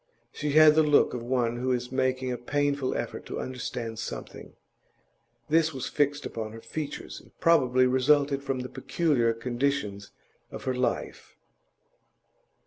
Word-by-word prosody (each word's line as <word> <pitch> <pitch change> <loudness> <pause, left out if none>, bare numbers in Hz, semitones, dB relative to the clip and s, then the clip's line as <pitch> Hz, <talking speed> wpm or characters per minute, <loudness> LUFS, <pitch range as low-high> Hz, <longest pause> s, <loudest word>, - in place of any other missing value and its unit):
She 145 -1 -2
had 155 0 +8
the 160 - +5
look 150 -2 +4
of 125 - -4
one 120 -1 0
who 130 +1 -1
is 125 0 -2
making 130 -1 0
a 125 - -2
painful 145 +1 0
effort - - -4
to - - -5
understand 120 -3 -5
something; - - -7 0.9
this 160 -1 +2
was 130 - -3
fixed 145 0 0
upon 110 -1 -5
her 115 - -9
features, 155 +3 -6
and - - -24
probably 130 -7 +4
resulted 140 +2 +3
from 135 -2 -2
the 125 - -6
peculiar 140 -9 +1
conditions 120 -3 -2 0.4
of - - -8
her 130 - -1
life. 125 -1 -3
130 Hz, 145 wpm, -27 LUFS, 120-145 Hz, 0.9 s, had